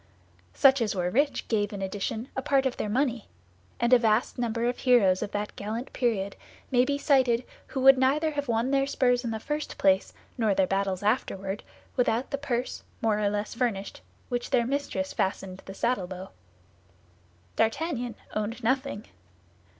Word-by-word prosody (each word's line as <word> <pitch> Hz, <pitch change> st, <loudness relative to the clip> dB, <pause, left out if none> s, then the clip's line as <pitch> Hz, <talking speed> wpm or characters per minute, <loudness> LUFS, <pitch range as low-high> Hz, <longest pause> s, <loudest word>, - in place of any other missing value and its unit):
Such 270 Hz, -2 st, +5 dB
as 215 Hz, -3 st, 0 dB
were 180 Hz, -1 st, 0 dB
rich 285 Hz, +6 st, +1 dB
gave 205 Hz, -2 st, 0 dB
in 200 Hz, -2 st, -5 dB
addition 205 Hz, +5 st, -3 dB
a 265 Hz, -, -1 dB
part 270 Hz, 0 st, +2 dB
of 260 Hz, -, 0 dB
their 210 Hz, -, -2 dB
money; 245 Hz, 0 st, 0 dB, 0.5 s
and 240 Hz, +1 st, +3 dB
a 250 Hz, -, +8 dB
vast 225 Hz, +2 st, +1 dB
number 235 Hz, -1 st, -1 dB
of 245 Hz, 0 st, -1 dB
heroes 205 Hz, -8 st, +4 dB
of -, -, -2 dB
that 210 Hz, 0 st, -4 dB
gallant 220 Hz, +5 st, -5 dB
period 205 Hz, -6 st, 0 dB, 0.4 s
may 250 Hz, -1 st, +4 dB
be 280 Hz, +1 st, 0 dB
cited 260 Hz, -4 st, +3 dB, 0.2 s
who 265 Hz, -, -3 dB
would 270 Hz, 0 st, +7 dB
neither 295 Hz, +5 st, +2 dB
have 285 Hz, -1 st, -3 dB
won 235 Hz, +2 st, +1 dB
their 275 Hz, 0 st, +2 dB
spurs 245 Hz, -3 st, +2 dB
in 235 Hz, -, -2 dB
the 220 Hz, -1 st, -3 dB
first 295 Hz, +6 st, -4 dB
place, 190 Hz, 0 st, +3 dB, 0.3 s
nor 215 Hz, -4 st, +2 dB
their 190 Hz, -, +3 dB
battles 195 Hz, 0 st, -1 dB
afterward, 200 Hz, -3 st, -1 dB, 0.3 s
without 245 Hz, 0 st, +1 dB
the 280 Hz, -, -2 dB
purse, 255 Hz, -3 st, -2 dB, 0.2 s
more 220 Hz, -3 st, +1 dB
or 205 Hz, -1 st, +2 dB
less 205 Hz, +1 st, -3 dB
furnished, 230 Hz, -5 st, -2 dB, 0.3 s
which 245 Hz, -1 st, -3 dB
their 235 Hz, -, +3 dB
mistress 265 Hz, -8 st, -2 dB
fastened 190 Hz, -1 st, -2 dB
to -, -, -17 dB
the 195 Hz, -, -7 dB
saddle 200 Hz, -4 st, 0 dB
bow. 185 Hz, +1 st, -8 dB, 1.2 s
D'Artagnan 245 Hz, 0 st, 0 dB, 0.2 s
owned 215 Hz, +3 st, -3 dB
nothing. 260 Hz, -2 st, 0 dB
235 Hz, 175 wpm, -27 LUFS, 205-260 Hz, 1.2 s, a